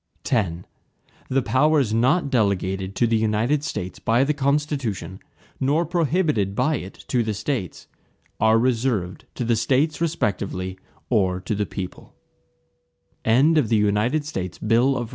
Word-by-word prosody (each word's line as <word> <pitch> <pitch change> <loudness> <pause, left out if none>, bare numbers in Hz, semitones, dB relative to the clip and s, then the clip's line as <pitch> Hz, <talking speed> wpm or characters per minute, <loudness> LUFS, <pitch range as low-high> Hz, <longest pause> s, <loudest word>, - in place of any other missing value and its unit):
X 90 -8 0 0.7
The 135 0 +1
powers 140 -4 +2
not 135 +7 +2
delegated 95 -4 0
to 120 - +2
the 115 -1 +2
United 110 +7 +1
States 90 -9 -5
by 115 +3 +2
the 150 +2 +1
Constitution, 140 - -1 0.4
nor 145 +6 +1
prohibited 155 - 0
by 155 +5 +1
it 95 -3 -8
to 125 - +2
the 110 -2 -2
States, 105 - -4 0.5
are 110 +1 +4
reserved 115 -6 0
to 120 - -3
the 115 0 +2
States 135 +8 +1
respectively, 95 - -2 0.3
or 95 -5 +2
to 95 - -3
the 105 0 -1
people. 95 -3 -7
115 Hz, 115 wpm, -23 LUFS, 100-140 Hz, 0.7 s, are